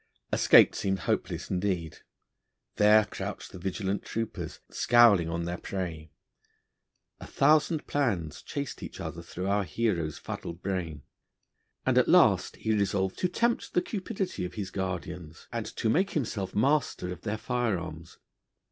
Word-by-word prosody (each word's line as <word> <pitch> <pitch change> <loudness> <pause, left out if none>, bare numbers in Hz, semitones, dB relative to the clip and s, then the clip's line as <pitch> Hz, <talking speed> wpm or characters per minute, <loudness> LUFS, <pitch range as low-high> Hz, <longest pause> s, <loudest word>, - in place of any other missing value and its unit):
Escape - - +7
seemed 95 0 -1
hopeless - - -2
indeed; 90 -4 -1 0.8
there 105 +1 +6
crouched - - -6
the 95 - -9
vigilant 95 +2 -2
troopers, 115 0 -4
scowling 115 -8 +5
on 85 +1 -2
their 85 0 -4
prey. 85 -5 -5 1.1
A - - -9
thousand 155 0 +3
plans 100 - -1
chased 140 -3 -5
each - - -8
other 80 +1 -5
through 85 +2 -7
the 100 +2 +2
hero's 90 -7 -1
fuddled 85 +1 -7
brain, 85 -7 -3 0.8
and - - +4
at - - +2
last - - +5
he 110 - -1
resolved 95 -2 0
to 180 - +1
tempt 235 +6 0
the 180 - +4
cupidity 195 - -3
of 90 0 -5
his 95 -3 -4
guardians, 90 -4 -5
and - - -3
to - - -3
make 185 - +2
himself 105 -9 -2
master 135 -6 +1
of - - -12
their 110 0 -2
fire 120 -4 0
arms. 80 -1 -8
95 Hz, 145 wpm, -29 LUFS, 90-115 Hz, 1.1 s, Escape